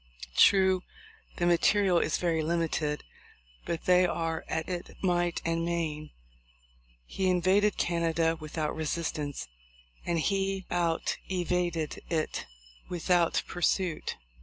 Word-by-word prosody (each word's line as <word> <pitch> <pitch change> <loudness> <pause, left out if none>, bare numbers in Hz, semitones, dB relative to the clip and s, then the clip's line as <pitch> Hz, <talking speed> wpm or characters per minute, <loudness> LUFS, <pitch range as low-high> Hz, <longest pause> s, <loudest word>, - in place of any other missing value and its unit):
True, 190 -2 +5 0.6
the 175 - +1
material 180 +1 +4
is - - 0
very 165 -2 +1
limited, 160 -2 -1 0.6
but 170 - -2
they 180 0 +5
are 165 -1 -2
at 160 0 -2
it 180 -1 -5
might 175 -2 +1
and 165 0 0
main. 160 -3 -2 1.0
He 190 - -1
invaded 190 +4 +3
Canada 165 -1 +1
without 155 -1 -3
resistance, 155 - -3 0.6
and 170 -1 0
he 195 +1 0
outvaded 175 -1 -1
it 160 - -2 0.4
without 175 -1 +2
pursuit. 175 -1 -1
170 Hz, 105 wpm, -29 LUFS, 160-180 Hz, 1.0 s, True